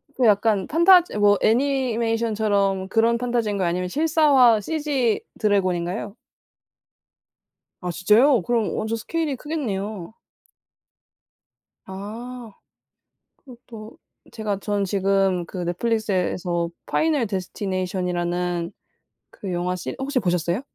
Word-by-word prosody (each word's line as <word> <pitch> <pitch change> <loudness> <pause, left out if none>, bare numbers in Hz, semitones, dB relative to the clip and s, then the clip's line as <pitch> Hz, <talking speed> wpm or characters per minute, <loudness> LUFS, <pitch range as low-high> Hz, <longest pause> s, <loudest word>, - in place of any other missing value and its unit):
그거 250 -3 +3
약간 205 -2 +2
판타지 345 - +5
뭐 205 -1 +4
애니메이션처럼 225 -6 +1
그런 230 +3 +2
판타지인가요? 225 -6 -1
아니면 180 +1 -1
실사화 280 - +4
CG 285 -6 -1 0.2
드래곤인가요? 195 +1 -1 1.6
아 180 -1 -3
진짜요? 225 - +4
그럼 230 +2 -1
완전 220 +1 -2
스케일이 310 +3 -2
크겠네요. 215 - -4 1.7
아. 225 +5 -8 0.9
그것도 235 -4 -13 0.3
제가 210 -3 -3
전 205 -1 -1
지금 195 -2 +1
그 185 - -7
넷플릭스에서 180 -3 -1 0.2
'파이널 310 -6 +1
데스티네이션'이라는 180 -3 -2 0.6
그 195 -3 -7
영화 180 +1 -1
시 180 - -6
혹시 270 0 -1
보셨어요? 175 +1 0
210 Hz, 265 characters per minute, -23 LUFS, 185-240 Hz, 1.7 s, 판타지